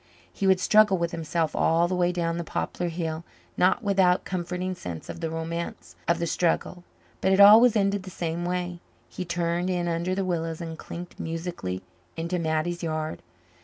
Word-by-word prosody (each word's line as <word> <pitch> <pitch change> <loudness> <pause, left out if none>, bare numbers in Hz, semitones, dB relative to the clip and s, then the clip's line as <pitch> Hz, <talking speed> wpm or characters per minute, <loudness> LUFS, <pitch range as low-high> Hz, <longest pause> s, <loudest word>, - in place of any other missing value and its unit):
He 195 - -1
would 190 -1 +5
struggle 210 -1 +5
with 170 0 -1
himself 165 -1 -1
all 165 +1 +3
the 185 - -2
way 180 -1 +2
down 170 -1 -1
the - - -2
poplar 175 +2 -3
hill 165 -1 -3 0.3
not 185 +6 +3
without 190 -3 +3
a - - -33
comforting 180 0 -3
sense 90 - -7
of - - -6
the 165 -1 -2
romance 165 +1 -5
of 170 - +3
the 170 - -1
struggle 175 +1 0 0.4
but 190 - +2
it 190 - +3
always 215 +4 +9
ended 200 -1 +2
the 185 - -9
same 170 -1 -3
way. 180 0 -2 0.3
He 185 - -5
turned 175 +1 -1
in 175 -1 0
under 170 +2 -1
the 195 0 -1
willows 165 -3 -2
and 165 -1 -5
clinked 175 +2 -9
musically 165 - -4 0.3
into 170 +2 -2
Mattie's 160 +2 -1
yard. 155 -1 -3
175 Hz, 185 wpm, -26 LUFS, 165-185 Hz, 0.4 s, always